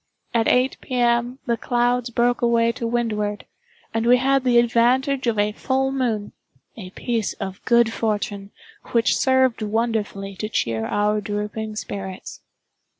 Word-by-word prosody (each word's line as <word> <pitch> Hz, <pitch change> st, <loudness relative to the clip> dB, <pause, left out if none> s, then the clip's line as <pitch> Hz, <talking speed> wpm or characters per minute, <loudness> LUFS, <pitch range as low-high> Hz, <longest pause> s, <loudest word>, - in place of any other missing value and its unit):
At 230 Hz, -1 st, +2 dB
eight 255 Hz, +2 st, +2 dB
P. 255 Hz, -, -5 dB
M., 240 Hz, +1 st, +1 dB
the 235 Hz, -3 st, 0 dB
clouds 245 Hz, +1 st, 0 dB
broke 240 Hz, +1 st, +1 dB
away 235 Hz, -1 st, +3 dB
to 230 Hz, 0 st, -4 dB
windward, 215 Hz, -3 st, -2 dB, 0.5 s
and 225 Hz, +1 st, 0 dB
we 250 Hz, +1 st, +6 dB
had 270 Hz, +1 st, +2 dB
the 245 Hz, -2 st, +3 dB
advantage 245 Hz, +3 st, +2 dB
of 230 Hz, -2 st, +1 dB
a 205 Hz, +1 st, +2 dB
full 265 Hz, +4 st, -1 dB
moon—a 220 Hz, -5 st, -5 dB
piece 230 Hz, -4 st, -2 dB
of 190 Hz, 0 st, -7 dB
good 235 Hz, -2 st, +4 dB
fortune 205 Hz, -2 st, -2 dB, 0.4 s
which 230 Hz, -1 st, +3 dB
served 260 Hz, -3 st, +2 dB
wonderfully 210 Hz, -3 st, -2 dB
to 215 Hz, -, -4 dB
cheer 115 Hz, -, -1 dB
our 210 Hz, +1 st, +1 dB
drooping 210 Hz, +1 st, -4 dB
spirits. 195 Hz, -3 st, -7 dB
230 Hz, 145 wpm, -22 LUFS, 210-245 Hz, 0.5 s, we